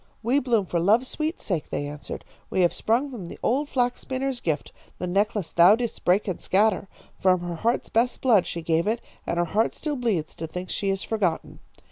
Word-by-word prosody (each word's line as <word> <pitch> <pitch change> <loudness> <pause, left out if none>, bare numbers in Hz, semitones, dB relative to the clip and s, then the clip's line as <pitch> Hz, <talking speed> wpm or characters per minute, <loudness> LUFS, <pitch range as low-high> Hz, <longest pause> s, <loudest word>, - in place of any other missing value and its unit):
"'We 250 +5 +3
bloom 235 -6 +1
for 175 -1 -1
love's 220 +9 +3
sweet 315 +2 -2
sake,' 175 -7 -2
they 145 - -2
answered. 145 0 -7 0.2
'We 185 - +1
have 175 - +3
sprung 250 +6 0
from 205 -9 -7
the - - -9
old 280 +5 +1
flax 245 -1 0
spinner's 265 -1 -3
gift, 160 -3 -2 0.3
the 180 - -3
necklace 195 -1 0
thou 175 +5 +7
didst 235 -1 -4
break 190 +4 +3
and 185 - -3
scatter. 205 +1 +2 0.3
From 185 -1 +3
her 175 0 -4
heart's 235 +7 0
best 240 +2 +1
blood 225 -8 +4
she 170 - -5
gave 165 +3 +1
it, 225 +2 +1 0.3
and 170 - -1
her 175 - +2
heart 215 +6 +1
still 300 -2 -3
bleeds 210 -11 -1
to 165 - -4
think 180 +3 -6
she 200 - -1
is 195 0 -1
forgotten.' 195 -7 -1
205 Hz, 210 wpm, -25 LUFS, 175-245 Hz, 0.3 s, thou